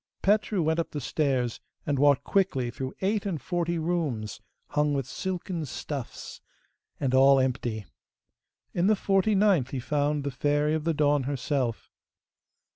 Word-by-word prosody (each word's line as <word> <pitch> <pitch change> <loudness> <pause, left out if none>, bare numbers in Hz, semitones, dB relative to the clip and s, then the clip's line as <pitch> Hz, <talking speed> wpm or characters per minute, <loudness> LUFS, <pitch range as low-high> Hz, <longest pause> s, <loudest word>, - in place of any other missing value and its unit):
Petru 205 -2 +2
went 160 +1 +1
up 165 - -1
the 150 - -4
stairs 130 -4 0 0.3
and 145 -2 0
walked 145 -1 +4
quickly 135 -11 +1
through 130 +2 -5
eight 200 +2 +1
and 185 -6 -2
forty 170 0 -1
rooms, 155 - -2 0.3
hung 150 -1 +1
with 135 -2 -1
silken 180 +5 -4
stuffs, 140 -2 -6 0.6
and 135 -3 0
all 135 +1 +6
empty. 120 -5 -1 0.9
In 175 +2 +2
the 215 - +5
forty 195 +1 +2
ninth 190 - +3
he 135 - -3
found 145 +2 0
the 140 - -2
Fairy 145 +3 +1
of 160 -1 -2
the 165 -1 +1
Dawn 145 -2 +2
herself. 135 -3 -2
145 Hz, 150 wpm, -27 LUFS, 130-175 Hz, 0.9 s, all